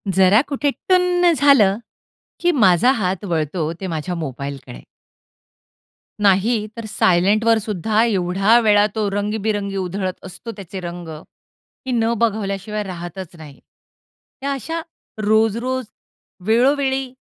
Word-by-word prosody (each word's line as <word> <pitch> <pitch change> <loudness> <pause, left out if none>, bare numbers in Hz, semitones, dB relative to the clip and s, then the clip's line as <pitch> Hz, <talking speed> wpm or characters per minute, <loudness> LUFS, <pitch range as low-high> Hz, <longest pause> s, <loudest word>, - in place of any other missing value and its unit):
जरा 190 +4 +5
कुठे 285 0 -1
टुन्न 360 +1 +2
झालं, 235 -9 +5 0.6
की 350 - +2
माझा 225 - +4
हात 190 0 -2
वळतो 160 -2 -2
ते 190 - -3
माझ्या 165 +1 -3
मोबाईलकडे. 140 - -6 1.4
नाही, 210 +3 +2
तर 230 - -6
सायलेंटवर 210 +4 +3
सुद्धा 215 +1 0
एवढा 195 +1 +3
वेळा 210 -2 +4
तो 215 -2 0
रंगीबिरंगी 205 0 -2
उधळत 185 0 -3
असतो 190 +5 -8
त्याचे 195 -1 -8
रंग, 175 -1 -7 0.8
की 260 - -3
न 230 -1 +1
बघवल्याशिवाय 210 -2 -1
राहतच 180 -1 -8
नाही. 150 -4 -12 0.8
या 280 - -1
अशा 325 +5 -4 0.5
रोज-रोज 230 +4 +1 0.6
वेळोवेळी, 265 +2 +2
205 Hz, 110 wpm, -20 LUFS, 185-235 Hz, 1.4 s, जरा